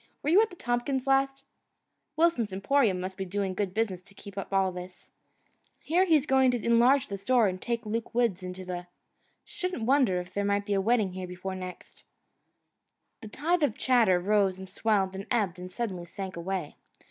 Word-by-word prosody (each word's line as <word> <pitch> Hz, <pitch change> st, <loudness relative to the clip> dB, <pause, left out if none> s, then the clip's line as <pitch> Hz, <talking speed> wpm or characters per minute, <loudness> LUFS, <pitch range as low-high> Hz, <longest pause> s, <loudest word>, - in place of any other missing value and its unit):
Were 300 Hz, -, +1 dB
you 385 Hz, +5 st, +7 dB
at 445 Hz, -, +1 dB
the 360 Hz, -, -12 dB
Tompkins' 250 Hz, -1 st, -1 dB
last 270 Hz, 0 st, +1 dB, 0.4 s
" 295 Hz, -, -53 dB
"Wilson's 315 Hz, -, +2 dB
Emporium 195 Hz, 0 st, +2 dB
must 185 Hz, +1 st, -5 dB
be 195 Hz, -, -2 dB
doing 190 Hz, 0 st, -2 dB
good 195 Hz, 0 st, -2 dB
business 195 Hz, -3 st, -1 dB
to 200 Hz, +2 st, -20 dB
keep 200 Hz, -1 st, -11 dB
up 195 Hz, -1 st, -5 dB
all 195 Hz, -1 st, +2 dB
this 180 Hz, 0 st, -10 dB, 0.3 s
" -, -, -40 dB
"Hear 355 Hz, +4 st, +3 dB
he's 310 Hz, -6 st, +3 dB
going 265 Hz, -2 st, +4 dB
to 245 Hz, -3 st, -1 dB
enlarge 245 Hz, +4 st, +4 dB
the 200 Hz, -1 st, -6 dB
store 240 Hz, +3 st, +3 dB
and 185 Hz, -1 st, -3 dB
take 235 Hz, -1 st, -2 dB
Luke 225 Hz, +2 st, -4 dB
Woods 230 Hz, -6 st, +1 dB
into 185 Hz, 0 st, -7 dB
the 180 Hz, -1 st, -5 dB, 0.3 s
" -, -, -44 dB
"Shouldn't 365 Hz, -, -4 dB
wonder 255 Hz, -8 st, +3 dB
if 180 Hz, +1 st, -8 dB
there 200 Hz, -, -1 dB
might 200 Hz, 0 st, 0 dB
be 205 Hz, -, -1 dB
a 195 Hz, -, +2 dB
wedding 215 Hz, -3 st, +2 dB
here 185 Hz, 0 st, -5 dB
before 180 Hz, +1 st, -6 dB
next 185 Hz, -1 st, -9 dB, 0.6 s
" -, -, -52 dB
The 220 Hz, -, -8 dB
tide 320 Hz, +10 st, 0 dB
of 280 Hz, -7 st, +1 dB
chatter 230 Hz, -8 st, +4 dB
rose 195 Hz, 0 st, +2 dB
and 190 Hz, 0 st, -9 dB
swelled 195 Hz, -1 st, 0 dB
and 195 Hz, +3 st, -6 dB
ebbed 200 Hz, -7 st, 0 dB
and 180 Hz, 0 st, -7 dB
suddenly 185 Hz, -5 st, -4 dB
sank 190 Hz, +2 st, -7 dB
away. 175 Hz, -2 st, -4 dB
205 Hz, 205 wpm, -28 LUFS, 185-250 Hz, 0.6 s, you